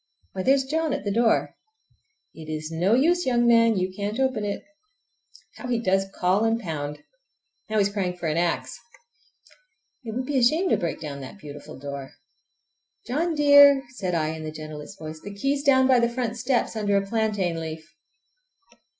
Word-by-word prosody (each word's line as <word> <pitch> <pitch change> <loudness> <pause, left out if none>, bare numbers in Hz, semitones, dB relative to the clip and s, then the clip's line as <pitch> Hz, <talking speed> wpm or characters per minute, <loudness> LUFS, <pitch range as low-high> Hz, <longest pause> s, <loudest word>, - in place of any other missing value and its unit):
Why, 190 - -4
there's 270 +6 +3
John 315 +1 -1
at - - -3
the 205 - -2
door! 225 +2 +2 0.8
It 160 -1 -11
is 155 0 -4
no 180 +7 +2
use, 340 +5 +2
young 240 -1 +2
man, 230 -2 +5
you 185 0 -1
can't 205 +4 -3
open 260 -5 0
it! 205 -1 -3 0.9
How 250 - -7
he 240 -2 0
does 195 -3 +1
call 185 +4 +1
and 225 +1 +1
pound! 150 -6 -5 0.7
Now 215 - -1
he's 200 -1 +2
crying 185 -3 -2
for 175 - -7
an 155 -1 0
axe. 170 0 -1 1.3
It 225 -2 -6
would 255 +1 -2
be 275 -1 0
a - - +2
shame 320 +10 +3
to - - +3
break 170 -5 -3
down 145 -3 -6
that 130 +9 -9
beautiful 145 -7 -10
door! 140 0 -7 0.9
"John 320 +6 -1
dear!" 285 -2 +7
said 190 -8 -3
I 155 -2 0
in 160 0 -6
the 155 - -4
gentlest 155 -1 -9
voice, 155 0 -8
"the 205 0 -9
key 275 +8 0
is 285 - -3
down 260 -2 +4
by 255 -2 +5
the 235 0 +2
front 235 -1 -3
steps, 245 0 0
under 205 -2 +1
a 195 - 0
plantain 200 -5 -1
leaf!" 160 -1 -6
205 Hz, 185 wpm, -25 LUFS, 165-255 Hz, 1.3 s, dear